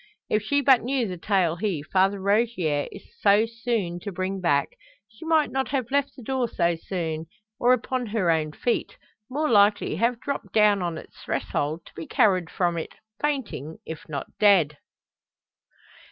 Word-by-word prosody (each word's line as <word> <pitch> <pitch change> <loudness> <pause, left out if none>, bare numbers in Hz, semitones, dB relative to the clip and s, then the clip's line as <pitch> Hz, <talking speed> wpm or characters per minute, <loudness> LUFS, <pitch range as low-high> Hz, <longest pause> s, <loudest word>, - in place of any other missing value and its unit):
If 215 - +3
she 285 +7 +1
but 265 -3 +5
knew 255 -1 0
the 185 - -4
tale 180 -4 +1
he, 180 -7 -2
Father 195 +4 +2
Rogier, 195 -7 +1
is - - -11 0.2
so 205 +3 +5
soon 225 -6 -2
to 200 - -6
bring 190 +1 -3
back, 145 -5 +2 0.4
she 220 +7 -14
might 320 -2 +3
not 265 -2 -1
have 255 -1 -2
left 280 0 +1
the 255 - -11
door 260 +1 0
so 170 -5 +1
soon, 165 -2 -4 0.3
or 245 - +4
upon 255 0 0
her 205 -5 +1
own 155 -2 0
feet; 235 +9 -2 0.3
more 300 +4 0
likely 205 - +3
have 235 +3 +1
dropped 275 +2 -5
down 210 -2 +4
on 170 -2 -2
its - - -12
threshold, 155 +3 -2
to - - -16
be 160 - -8
carried 185 -5 +2
from 175 -2 0
it - - -7 0.3
fainting, 250 - -2
if 160 -1 -8
not 140 -3 -3
dead! 175 -8 +4
200 Hz, 170 wpm, -25 LUFS, 170-240 Hz, 0.4 s, but